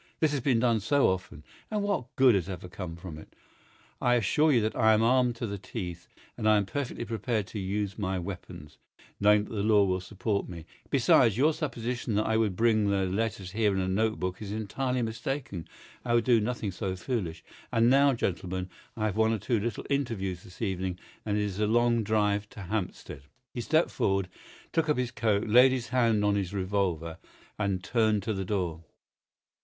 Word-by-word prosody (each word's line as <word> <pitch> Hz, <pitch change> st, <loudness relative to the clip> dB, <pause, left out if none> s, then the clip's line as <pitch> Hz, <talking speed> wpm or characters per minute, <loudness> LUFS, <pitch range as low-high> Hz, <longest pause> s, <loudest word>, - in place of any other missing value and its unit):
This 155 Hz, -2 st, +3 dB
has 145 Hz, -, 0 dB
been 130 Hz, -2 st, +2 dB
done 115 Hz, -2 st, +2 dB
so 140 Hz, +7 st, +3 dB
often, 90 Hz, -5 st, -4 dB, 0.3 s
and 210 Hz, -1 st, -1 dB
what 180 Hz, -12 st, -2 dB
good 130 Hz, -2 st, +6 dB
has 95 Hz, -1 st, 0 dB
ever 90 Hz, -1 st, -6 dB
come 90 Hz, -2 st, -7 dB
from 85 Hz, -3 st, -9 dB
it? -, -, -15 dB, 0.7 s
I 120 Hz, 0 st, +3 dB
assure 150 Hz, +7 st, +3 dB
you 125 Hz, -, +4 dB
that 110 Hz, +1 st, -1 dB
I 110 Hz, -2 st, +5 dB
am 110 Hz, -, +2 dB
armed 125 Hz, 0 st, +3 dB
to 120 Hz, -, -4 dB
the 100 Hz, -2 st, -5 dB
teeth, 90 Hz, -4 st, -6 dB, 0.3 s
and 110 Hz, -, +1 dB
I 110 Hz, -, +6 dB
am 100 Hz, -, +1 dB
perfectly 125 Hz, +1 st, -4 dB
prepared 115 Hz, -1 st, -2 dB
to 105 Hz, -, -5 dB
use 100 Hz, +1 st, -3 dB
my 95 Hz, -2 st, -1 dB
weapons, 85 Hz, -5 st, -8 dB, 0.4 s
knowing 105 Hz, 0 st, +5 dB
that 105 Hz, -, -9 dB
the 105 Hz, -, -1 dB
law 105 Hz, -1 st, +4 dB
will 95 Hz, -1 st, 0 dB
support 100 Hz, +1 st, -2 dB
me. 85 Hz, -2 st, -8 dB, 0.2 s
Besides, 110 Hz, -2 st, +4 dB
your 150 Hz, +5 st, +4 dB
supposition 125 Hz, -6 st, -3 dB
that 105 Hz, -, +1 dB
I 110 Hz, -, +1 dB
would 110 Hz, -4 st, +1 dB
bring 110 Hz, -1 st, +3 dB
the 100 Hz, -1 st, +1 dB
letters 100 Hz, 0 st, -2 dB
here 105 Hz, -1 st, +1 dB
in -, -, 0 dB
a 95 Hz, -, -1 dB
note 110 Hz, +4 st, 0 dB
book 90 Hz, +2 st, -3 dB
is 100 Hz, -2 st, -5 dB
entirely 125 Hz, +4 st, -2 dB
mistaken. 110 Hz, -, -4 dB, 0.4 s
I 120 Hz, -1 st, +1 dB
would 120 Hz, -, +3 dB
do 120 Hz, -2 st, +4 dB
nothing 110 Hz, -2 st, -2 dB
so 95 Hz, 0 st, -3 dB
foolish. 90 Hz, -6 st, -3 dB, 0.3 s
And 115 Hz, +1 st, +3 dB
now, 140 Hz, +2 st, +5 dB
gentlemen, 95 Hz, -3 st, -3 dB, 0.3 s
I 110 Hz, -, 0 dB
have 105 Hz, -1 st, -1 dB
one 110 Hz, 0 st, +3 dB
or -, -, 0 dB
two 115 Hz, +3 st, 0 dB
little 110 Hz, 0 st, -3 dB
interviews 110 Hz, -10 st, -2 dB
this 90 Hz, +5 st, -9 dB
evening, 95 Hz, -3 st, -2 dB, 0.3 s
and 105 Hz, 0 st, +1 dB
it 105 Hz, -, +1 dB
is 100 Hz, -1 st, -3 dB
a 105 Hz, -, +2 dB
long 120 Hz, +1 st, +3 dB
drive 105 Hz, -1 st, +1 dB
to 105 Hz, -, -10 dB
Hampstead." 95 Hz, -7 st, -4 dB, 0.3 s
He 120 Hz, -, -3 dB
stepped 155 Hz, +7 st, +2 dB
forward, 95 Hz, -1 st, 0 dB, 0.4 s
took 165 Hz, -1 st, +1 dB
up 150 Hz, -, +2 dB
his 125 Hz, -1 st, -1 dB
coat, 110 Hz, -4 st, +1 dB
laid 125 Hz, +4 st, +7 dB
his 125 Hz, -2 st, -3 dB
hand 115 Hz, -4 st, +2 dB
on 105 Hz, -, +3 dB
his 100 Hz, -1 st, -2 dB
revolver, 95 Hz, -4 st, -1 dB, 0.4 s
and 100 Hz, -3 st, -1 dB
turned 110 Hz, -1 st, +1 dB
to 110 Hz, -, -1 dB
the 95 Hz, -1 st, -3 dB
door. 90 Hz, -5 st, -2 dB
105 Hz, 205 wpm, -28 LUFS, 95-120 Hz, 0.7 s, laid